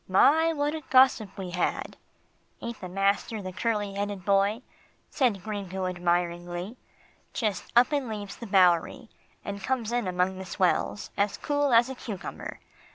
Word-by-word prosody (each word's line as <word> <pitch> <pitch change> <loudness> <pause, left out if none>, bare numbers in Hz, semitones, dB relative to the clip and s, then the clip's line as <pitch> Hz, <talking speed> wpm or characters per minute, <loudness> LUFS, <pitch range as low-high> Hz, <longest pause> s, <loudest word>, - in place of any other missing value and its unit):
My! 315 - +5
what 295 -1 -1
a 315 - -4
gossip 255 -6 +4
we 185 -2 -5
had. 180 0 -2 0.6
"Ain't 235 0 -6
master 200 +4 0
the 185 -2 -6
curly 210 -2 -1
headed 200 -2 -4
boy," 200 +4 +2 0.5
said 230 - +1
Gringo 190 -3 -4
admiringly. 175 +2 -1 0.6
"Just 215 -4 -2
up 245 +5 +6
and 280 -5 -1
leaves 205 -2 -5
the 235 - -8
Bowery, 190 +5 +3 0.4
and 200 0 -5
comes 235 -1 -1
in 240 -4 0
among 185 +1 0
the 190 - -6
swells, 185 +2 0
as 200 0 +1
cool 290 -1 0
as 235 +1 +6
a 265 - -5
cucumber. 215 -6 -7
205 Hz, 150 wpm, -27 LUFS, 185-240 Hz, 0.6 s, up